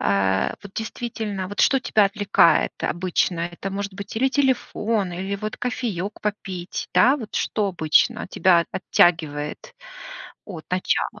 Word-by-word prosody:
А, 95 -1 +1
вот, 200 -1 -11
действительно, 220 -4 -4
вот, 205 - -3
что 270 -1 +4
тебя 215 -4 +3
отвлекает 195 -5 +3
обычно? 175 0 0
Это 195 +3 -6
может 200 0 -4
быть 200 +1 -8
или 265 +3 +3
телефон, 230 -8 0
или 190 +3 -3
вот 215 +1 -5
кофеек 215 -6 -3
попить, 190 -4 -4
да? 265 +4 +5
Вот, 225 -6 -9
что 210 -2 0
обычно 160 -4 +2
тебя 185 -4 +4
от - - -4
оттягивает 160 - +1 0.7
от 170 -7 -8
начала? 185 +3 -1
195 Hz, 140 wpm, -23 LUFS, 175-215 Hz, 0.7 s, да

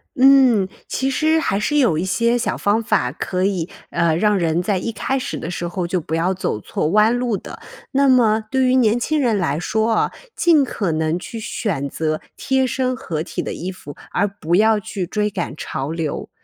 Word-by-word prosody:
嗯， 260 -6 +5 0.2
其 265 +1 -1
实 315 +4 +2
还 200 -10 0
是 295 +8 0
有 240 - +3
一 165 - -1
些 235 +5 +1
小 240 - -1
方 205 +3 +1
法 125 - +1
可 180 +6 -3
以， 185 -3 -1 0.2
呃， 170 -2 +2
让 210 +4 +2
人 170 -1 0
在 200 +1 0
一 230 - -3
开 265 +4 -2
始 - - -4
的 170 - -5
时 175 0 -3
候 175 +1 -3
就 175 +1 -1
不 160 +1 -3
要 175 +3 +1
走 180 - -2
错 130 - -2
弯 215 +7 +4
路 245 -4 0
的。 - - -10 0.3
那 275 0 +3
么 225 -4 +4
对 265 +1 +2
于 255 0 +3
年 235 -2 +3
轻 310 +5 0
人 235 -5 +2
来 160 -5 0
说 220 +5 0
啊， - - +1 0.2
尽 325 -4 +4
可 205 -8 -2
能 160 +2 0
去 225 +5 -7
选 195 - -2
择 155 +1 -2 0.2
贴 265 -1 +1
身 255 0 -1
合 165 -10 -4
体 175 - -4
的 - - -4
衣 185 +2 -5
服， 145 -6 -11 0.2
而 200 +3 +1
不 185 -4 -2
要 220 +2 +4
去 205 -3 -4
追 210 +4 -1
赶 185 -7 -4
潮 140 -1 -4
流。 160 -3 -3
205 Hz, 225 characters per minute, -20 LUFS, 170-245 Hz, 0.3 s, 嗯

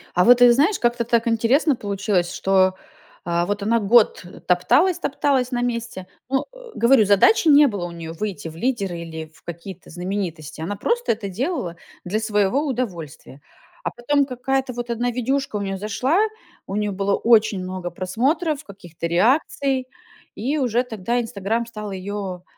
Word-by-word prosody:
А 180 - +4
вот, 245 +3 +7
ты 245 0 +8
знаешь, 305 - +2
как-то 240 0 +1
так 235 0 +1
интересно 245 +6 +2
получилось, 200 -4 -1
что, 190 -1 +2 0.5
а, 170 0 0
вот 205 +2 -2
она 230 +3 +2
год 215 0 +4 0.2
топталась-топталась 270 - +2
на 245 -1 -1
месте. 235 -6 -3 0.2
Ну, 270 +1 0
э, - - -14 0.2
говорю: 235 -1 +5
задачи 205 - +4
не 290 0 +7
было 205 -7 -3
у 175 - -6
неё 165 -1 -7
выйти 195 -1 -5
в 160 - -9
лидеры 200 -4 -2
или 160 -1 -7
в - - -23
какие-то 175 +2 -9
знаменитости. 175 -4 -5
Она 195 +5 -4
просто 480 - 0
это 215 -2 -3
делала 200 - -3 0.3
для 200 +5 -1
своего 215 +5 +1
удовольствия. 180 - -5 0.4
А - - -2
потом 280 +4 +1
какая-то 265 0 -2
вот 240 0 -6
одна 240 +1 -1
видюшка 255 -1 -1
у - - -3
неё 195 -1 -3
зашла, 250 - 0 0.5
у 195 - -5
неё 210 -1 -1
было 195 +1 0
очень 215 -4 +3
много 185 -1 -5
просмотров, 275 - -1
каких-то 175 - -7
реакций 260 - +1 0.5
и 270 +8 -1
уже 245 -2 +1
тогда 235 0 -2
"Инстаграм" 225 0 -2
стал 215 -3 -7
её, 190 -1 -5
215 Hz, 160 wpm, -22 LUFS, 185-250 Hz, 0.5 s, ты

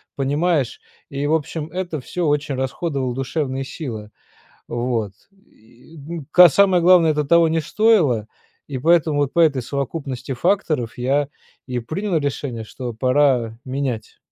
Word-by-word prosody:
понимаешь, 145 0 0 0.3
и 140 +1 -3
в 155 - +1
общем 160 0 -2
это 180 -3 -3
всё 170 +7 -3
очень 145 0 0
расходовала 130 0 -2
душевные 135 0 -2
силы, 110 -7 -7 0.6
вот. 120 -4 -2 0.4
И 120 +8 -19 0.3
ка 180 -1 +9
самое 190 +1 +4
главное 170 -3 +6
это 150 0 -1
того 170 +2 +4
не 160 0 +1
стоило, 155 - +2 0.4
и 140 - -5
поэтому 155 0 +3
вот 140 -1 0
по 170 - +2
этой 140 -6 +3
совокупности 135 0 -4
факторов 155 - 0
я 140 +3 +1 0.4
и 125 -2 -3
принял 170 - -2
решение, 140 -5 -3
что 120 +2 -6
пора 125 -2 +1
менять. 130 -4 -4
140 Hz, 140 wpm, -21 LUFS, 125-165 Hz, 0.6 s, ка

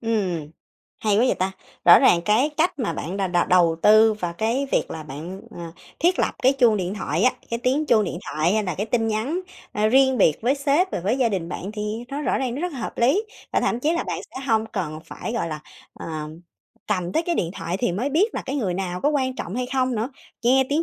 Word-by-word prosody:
Ừm, 190 -10 -1 0.5
hay 210 -2 +1
quá 230 - +4
vậy - - +2
ta! 190 +1 -1 0.3
Rõ 175 - +9
ràng 170 - +5
cái 230 +8 +3
cách 325 -2 +1
mà 240 - -1
bạn 175 +6 -5
đà 195 -1 0
đầu 175 -1 +2
đầu 170 -3 +4
tư 215 +1 +6
và 175 -5 -4
cái 230 +10 -1
việc - - +1
là 160 - -5
bạn, 155 +7 -8 0.2
à, 170 -1 -7 0.3
thiết 355 +3 +2
lập - - +1
cái 260 +2 +5
chuông 240 -5 +4
điện 185 0 -2
thoại 170 -4 -2
á, 255 - +5 0.2
cái 235 - -1
tiếng 280 +4 +1
chuông 220 -3 +4
điện 175 -2 -4
thoại 155 +4 0
hay 215 0 +2
là 180 - -2
cái 205 +3 -3
tin 225 0 0
nhắn, 245 +12 -1 0.3
a, 210 +1 +1
riêng 265 +1 +4
biệt 155 -6 +4
với 250 +4 +3
sếp 290 +6 +1
và - - -2
với 210 +9 0
gia 245 -3 +3
đình 185 -5 -3
bạn 190 +3 -5
thì 215 +2 -4
nó 280 +1 -4
rõ - - 0
ràng 255 -3 -2
nó 275 - -4
rất 355 0 -2
là 275 - -7
hợp 230 - -5
lý. 270 - +3 0.3
Và - - +2
thậm 235 - 0
chí 310 +4 +1
là 340 - 0
bạn - - -3
sẽ 260 - -7
hông 225 -2 +2
cần 175 -8 -4
phải, 190 - -6
gọi 230 -8 -1
là, 155 -1 -5 0.3
ờ, - - -9 0.8
cầm 180 -4 -1
tới 320 - +1
cái 340 0 -1
điện 170 - -1
thoại 175 - -3
thì 195 -2 0
mới 240 +10 -1
biết 380 +10 +2
là - - -3
cái 275 +2 -2
người 190 -9 -1
nào 180 -1 -3
có 290 - +2
quan 260 -3 0
trọng 175 - -5
hay 250 +1 -2
không 260 -1 +1
nữa, 225 +4 -2 0.3
nghe 260 +2 +4
tiếng 300 +3 +1
220 Hz, 255 wpm, -23 LUFS, 185-265 Hz, 0.8 s, Rõ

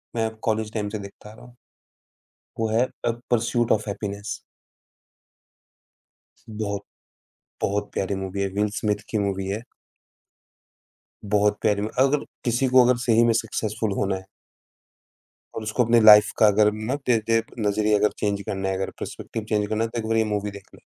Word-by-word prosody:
मैं 110 -1 -1
college 110 -1 -1
time 105 -2 -2
से 105 0 -5
देखता 100 +1 -11
आ 105 - -12
रहा 115 - -15
हूँ। 125 - -17 1.0
वो 115 - +1
है 115 +3 +3 0.2
अ, 120 - +3 0.2
परसूट 120 0 +1
ऑफ़ 110 0 +1
हैप्पीनेस। 100 0 -5 2.1
बहुत 105 -2 -3 0.8
बहुत 105 +1 -1
प्यारी 100 +1 -1
मूवी 95 0 -4
है, 100 - 0
विल 105 +2 0
स्मिथ 105 -1 -1
की 110 - 0
मूवी 95 -1 -1
है। 105 +4 -3 1.7
बहुत 105 0 +2
प्यारी 105 -1 +2
ल 105 - -1
अगर 140 +2 +3 0.2
किसी 120 +3 +1
को 130 0 +6
अगर 125 -1 +3
सही 115 -1 +4
में 115 -1 +4
सक्सेसफुल 110 0 -2
होना 100 -1 0
है 95 - -7 1.3
और 110 - -4
उसको 110 +3 +1
अपनी 115 0 +5
लाइफ़ 105 -1 +8
का 110 - +6
अगर 105 +1 +4 0.2
ना 135 - +1
दे 120 - +5
दे 115 0 +3 0.2
नज़रिया 105 0 +2
अगर 105 - +3
चेंज 100 -1 -1
करना 95 -1 -3
है, 95 - -1
अगर 95 0 -2
पर्सपेक्टिव 115 - -6
चेंज 105 -1 +1
करना 110 +1 0
है, 115 - -2
तो 115 - -4
एक 110 - -4
बार 115 - +1
ये 110 - +4
मूवी 105 0 -2
देख 100 -1 -12
लो। - - -19
105 Hz, 180 wpm, -24 LUFS, 100-115 Hz, 2.1 s, लाइफ़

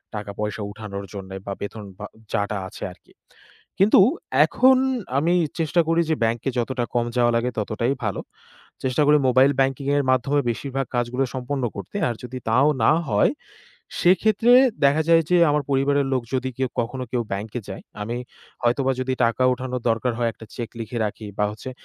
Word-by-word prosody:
টাকা 105 -1 -5
পয়সা 105 0 -3
উঠানোর 100 -2 -7
জন্যে 95 -1 -7
বা 100 - -3
বেতন 105 +1 -6 0.2
বা 105 - -5 0.3
যা-টা 100 0 -1
আছে 100 - -10
আরকি। 90 - -20 0.7
কিন্তু 200 +2 +6 0.4
এখন 260 +1 +4 0.4
আমি 165 +5 +2 0.2
চেষ্টা 165 +1 +2
করি 165 +1 +3
যে - - +4
bank-এ 115 +3 0
যতটা 120 +1 -1
কম 120 -1 +1
যাওয়া 120 -1 +3
লাগে 120 +2 0
ততটাই 110 +5 -1
ভালো। 105 - -2 0.6
চেষ্টা 130 +3 +1
করি 150 +1 +6
mobile 130 +3 +5
banking-এর 135 +2 +1
মাধ্যমে 135 +3 +2
বেশিরভাগ 135 +3 -3
কাজগুলো 120 +2 0
সম্পন্ন 130 +1 -3
করতে। 100 -1 -7
আর 120 - -2
যদি 125 +1 -6
তাও 130 +6 +4 0.2
না 115 - +6 0.2
হয়, 105 - +3 0.7
সেক্ষেত্রে 215 +6 +4 0.3
দেখা 145 +3 +4
যায় 165 0 +6
যে 180 - +5
আমার 150 0 +1
পরিবারের 140 +1 +2
লোক 130 -2 +1
যদি 130 0 -1
কেউ 130 -1 0
কখনো 125 +2 -4
কেউ 125 -2 +1
bank-এ 105 +4 -4
যায়, 95 - -7 0.2
আমি 115 +3 -3 0.5
হয়তোবা 130 +3 +2
যদি 130 0 -1
টাকা 115 +2 +1
উঠানোর 125 -1 -4
দরকার 115 +2 0
হয়, 120 -1 +1
একটা 110 - -13
cheque 120 -1 -6
লিখে 115 +2 -4
রাখি 105 +1 -7
বা 105 - +3
হচ্ছে 110 +4 -8
125 Hz, 175 wpm, -23 LUFS, 110-140 Hz, 0.7 s, কিন্তু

